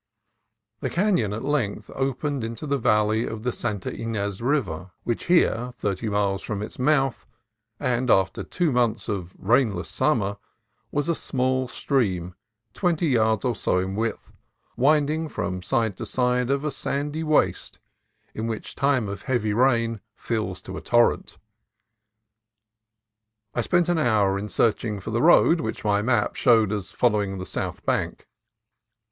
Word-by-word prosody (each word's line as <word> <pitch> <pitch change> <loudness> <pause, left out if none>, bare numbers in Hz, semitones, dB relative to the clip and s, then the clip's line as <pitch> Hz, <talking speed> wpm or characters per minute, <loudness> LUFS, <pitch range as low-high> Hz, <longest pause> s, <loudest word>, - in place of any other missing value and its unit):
The - - -2
canon 180 - +1
at 110 +2 -4
length 115 -8 -1
opened 135 0 -2
into 115 +5 -5
the 140 -1 0
valley 110 0 +2
of 110 -1 -6
the 125 - 0
Santa 105 -4 -3
Ynez 105 -3 -3
River, 100 - -1
which 120 - -2
here, 125 -9 +2
thirty 105 +2 -2
miles 100 -1 0
from 105 -1 -4
its 110 - -8
mouth, 135 -1 +1 0.5
and 125 -2 0
after 95 -2 +3
two 175 -4 -1
months 120 -3 +1
of 95 -3 -4
the - - -25
rainless 110 -4 +1
summer, 105 -9 +1 0.5
was 145 0 -1
a 170 - +2
small 130 -3 0
stream, 95 - -1 0.4
twenty 170 -3 +1
yards 110 -3 +2
or 120 -2 +1
so 90 - +1
in 95 +1 -1
width, 110 +2 -3 0.4
winding 150 +3 +2
from 90 -8 -3
side 110 +2 0
to - - -5
side 125 0 +1
of 140 +1 +1
a 150 - 0
sandy 145 +3 -2
waste 155 -1 +1 0.6
which 110 0 -4
in - - -19
time 135 -5 +2
of 100 0 -6
heavy 110 -5 0
rain 115 -2 +2
fills 110 -7 -3
to - - -7
a - - -6
torrent. 120 0 +2 2.2
I - - 0
spent 175 -2 +2
an 175 -2 +2
hour 105 -8 +2
in 105 +1 -5
searching 110 -2 +1
for 105 +4 -6
the 115 +2 0
road 170 +1 +5
which - - -4
my 105 -1 +2
map 115 -2 +1
showed 110 -5 +4
as 100 -3 -3
following 105 -5 +1
the 95 - -5
south - - -4
bank. - - -1
115 Hz, 155 wpm, -24 LUFS, 105-135 Hz, 2.2 s, road